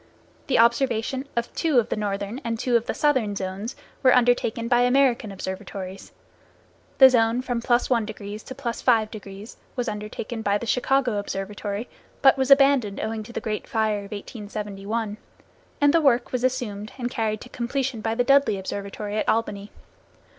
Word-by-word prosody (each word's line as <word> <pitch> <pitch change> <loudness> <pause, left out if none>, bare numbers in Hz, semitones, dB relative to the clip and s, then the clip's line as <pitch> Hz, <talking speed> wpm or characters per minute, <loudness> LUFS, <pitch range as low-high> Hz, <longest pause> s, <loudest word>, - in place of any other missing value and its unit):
The - - +2
observation 235 +2 +2
of 235 0 -2
two 315 -6 +1
of 235 - +3
the - - 0
northern 205 +4 -3
and 230 -1 -2
two 245 +1 0
of 235 0 +2
the - - -1
southern 260 -9 +1
zones 195 +5 -4 0.3
were 260 -2 +6
undertaken 240 -2 +2
by 240 0 +4
American 245 -3 +3
observatories. 190 0 -7 0.9
The 265 - +10
zone 235 0 +2
from 245 -2 -2
+1° 220 -4 -1
to 260 - -8
+5° 220 -5 -1 0.2
was 245 -2 -2
undertaken 215 +2 -5
by 205 -1 +1
the 235 - -6
Chicago 250 0 +1
Observatory, 205 +2 -4 0.4
but 270 - +7
was 265 0 0
abandoned 275 -7 +5
owing 220 0 -3
to 215 +3 -10
the - - -3
great 215 -1 -4
fire 220 -2 0
of 200 0 -10
1871, 210 0 -5 0.6
and 290 0 +4
the 335 - +4
work 255 -4 +3
was 250 -1 -2
assumed 230 -5 -2
and 245 -1 -3
carried 215 -3 -1
to 250 - -10
completion 250 -1 -2
by 225 +1 -1
the 245 - +2
Dudley 275 -4 +4
Observatory 200 +2 -5
at - - 0
Albany. 210 -2 -1
230 Hz, 160 wpm, -24 LUFS, 210-250 Hz, 0.9 s, The